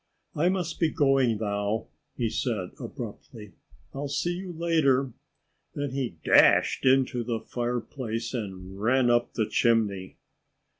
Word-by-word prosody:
"I 170 Hz, +4 st, +2 dB
must 185 Hz, -3 st, -2 dB
be 165 Hz, -, +3 dB
going 135 Hz, -7 st, +2 dB
now," 105 Hz, +1 st, -1 dB, 0.3 s
he 120 Hz, -, 0 dB
said 110 Hz, -5 st, -2 dB
abruptly. 105 Hz, -4 st, -8 dB, 0.4 s
"I'll 140 Hz, +1 st, -4 dB
see 170 Hz, +5 st, -1 dB
you 180 Hz, +1 st, -6 dB
later." 155 Hz, -6 st, +1 dB, 0.6 s
Then 145 Hz, -2 st, -2 dB
he 130 Hz, -10 st, -3 dB
dashed -, -, +5 dB
into 130 Hz, -2 st, +3 dB
the 115 Hz, -1 st, -2 dB
fireplace 120 Hz, -1 st, -4 dB
and 95 Hz, -4 st, -6 dB
ran 120 Hz, +2 st, +3 dB
up 120 Hz, 0 st, +1 dB
the 110 Hz, -, +1 dB
chimney. 105 Hz, -5 st, +1 dB
120 Hz, 130 wpm, -27 LUFS, 110-140 Hz, 0.6 s, dashed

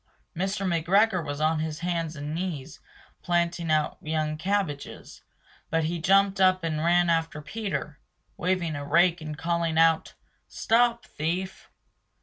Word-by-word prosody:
Mr. 195 Hz, +3 st, -2 dB
McGregor 185 Hz, +3 st, +2 dB
was 145 Hz, -1 st, -5 dB
on 155 Hz, +1 st, +1 dB
his 155 Hz, 0 st, -4 dB
hands 170 Hz, -2 st, -2 dB
and 145 Hz, +1 st, -5 dB
knees 160 Hz, -4 st, -5 dB, 0.4 s
planting 170 Hz, -1 st, 0 dB
out 155 Hz, -1 st, +1 dB
young 155 Hz, 0 st, -1 dB
cabbages, 180 Hz, -4 st, -3 dB, 0.5 s
but 165 Hz, 0 st, +1 dB
he 170 Hz, +2 st, -2 dB
jumped 195 Hz, +2 st, +3 dB
up 185 Hz, -1 st, +4 dB
and 155 Hz, -2 st, -1 dB
ran 175 Hz, +1 st, +3 dB
after 165 Hz, -2 st, 0 dB
Peter, 155 Hz, -4 st, -5 dB, 0.4 s
waving 175 Hz, -3 st, -1 dB
a 145 Hz, -, -5 dB
rake 175 Hz, +4 st, +3 dB
and 155 Hz, -1 st, -6 dB
calling 165 Hz, 0 st, -1 dB
out 165 Hz, 0 st, +3 dB, 0.3 s
"Stop 235 Hz, +1 st, +1 dB
thief!" 180 Hz, +5 st, -4 dB
170 Hz, 135 wpm, -26 LUFS, 155-185 Hz, 0.5 s, up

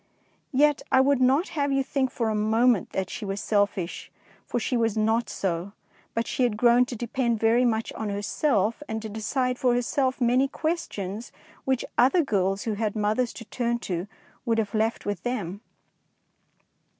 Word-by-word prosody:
Yet 290 Hz, +2 st, +3 dB
I -, -, +6 dB
would 270 Hz, 0 st, +3 dB
not 270 Hz, +8 st, +3 dB
have 285 Hz, -2 st, -1 dB
you 275 Hz, 0 st, +2 dB
think 265 Hz, -1 st, 0 dB
for 230 Hz, -3 st, -1 dB
a -, -, 0 dB
mo 220 Hz, +3 st, +2 dB
ment 240 Hz, -7 st, +3 dB
that 190 Hz, -1 st, -2 dB
she 235 Hz, -, -6 dB
was 195 Hz, 0 st, -3 dB
selfish, 200 Hz, -5 st, -1 dB, 0.4 s
for -, -, -1 dB
she 250 Hz, -, -1 dB
was 225 Hz, -2 st, +1 dB
not 220 Hz, +1 st, +1 dB
so; 185 Hz, +1 st, -3 dB, 0.4 s
but 230 Hz, 0 st, 0 dB
she -, -, -3 dB
had 240 Hz, -4 st, +2 dB
grown 240 Hz, +2 st, +5 dB
to 245 Hz, -, -6 dB
depend 235 Hz, 0 st, -1 dB
very 230 Hz, +3 st, +4 dB
much 225 Hz, -2 st, 0 dB
on 220 Hz, -2 st, -4 dB
herself, 205 Hz, +3 st, 0 dB
and 220 Hz, 0 st, -2 dB
to 220 Hz, -, -5 dB
decide 250 Hz, +4 st, -1 dB
for 250 Hz, -2 st, +3 dB
herself 260 Hz, +2 st, 0 dB
many 250 Hz, +2 st, +3 dB
questions 240 Hz, -, -3 dB, 0.3 s
which 265 Hz, -2 st, 0 dB
other 275 Hz, +8 st, +5 dB
girls 195 Hz, -5 st, 0 dB
who 225 Hz, -, -1 dB
had 215 Hz, 0 st, -2 dB
mothers 215 Hz, +3 st, +1 dB
to 230 Hz, -, -9 dB
turn 235 Hz, +1 st, -1 dB
to 180 Hz, +1 st, -3 dB, 0.4 s
would 230 Hz, -3 st, +1 dB
have 210 Hz, -3 st, -1 dB
left 220 Hz, +1 st, 0 dB
to 205 Hz, -, -1 dB
them. 205 Hz, -2 st, -4 dB
230 Hz, 180 wpm, -26 LUFS, 210-255 Hz, 0.4 s, I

